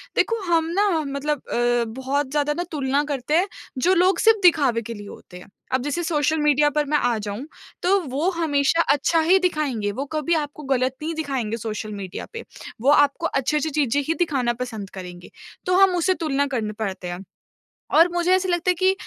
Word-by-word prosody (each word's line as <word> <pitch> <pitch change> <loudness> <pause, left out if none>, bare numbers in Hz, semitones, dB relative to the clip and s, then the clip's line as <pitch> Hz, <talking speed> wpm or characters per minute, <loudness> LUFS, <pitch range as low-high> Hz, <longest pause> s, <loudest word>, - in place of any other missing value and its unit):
देखो 460 -1 +1
हम 325 -1 +3
ना 410 0 +3 0.2
मतलब 280 +1 -2
अ, 240 0 +1
बहुत 265 +4 -2
ज़्यादा 295 0 +1
ना 350 - -1
तुलना 280 -1 0
करते 285 -1 -3
हैं 370 - +2 0.3
जो 350 +9 +3
लोग 365 0 +3
सिर्फ़ 445 -1 +5
दिखावे 285 -10 +4
के 230 +1 -7
लिए 205 -2 -9
होते 180 -2 -12
हैं। 180 - -13 0.3
अब 260 - +2
जैसे 295 +5 -2
सोशल 315 -1 +1
मीडिया 295 0 +3
पर 295 +1 0
मैं 300 +1 +1
आ 245 -4 +1
जाऊँ 210 +4 -5 0.4
तो 390 +2 +4
वो 285 +7 0
हमेशा 325 -2 +1
अच्छा 295 +4 +1
ही 360 +4 +4
दिखाएँगे, 290 - -1
वो 265 +7 -4
कभी 310 +3 -1
आपको 300 -1 -4
गलत 260 -1 0
नहीं 320 +2 -3
दिखाएँगे 265 -8 -2
सोशल 215 -1 -5
मीडिया 195 -3 -6
पे। 460 - -6 0.4
वो 265 - +3
आपको 290 +3 +3
अच्छी-अच्छी 300 +2 0
चीज़ें 285 -2 +1
ही 325 - +2
दिखाना 270 -8 +1
पसंद 220 -6 -7
करेंगे, 180 -2 -10 0.4
तो 360 - +2
हम 385 -1 +5
उसे 355 +2 +2
तुलना 285 -5 -1
करने 225 -6 -3
पड़ते 190 -4 -4
हैं। 175 +2 -6 0.7
और 335 +2 +7
मुझे 350 +1 +1
ऐसा 375 0 +1
लगता 350 +1 +1
है 360 - +2
कि 375 +2 +3
290 Hz, 200 wpm, -23 LUFS, 245-335 Hz, 0.7 s, और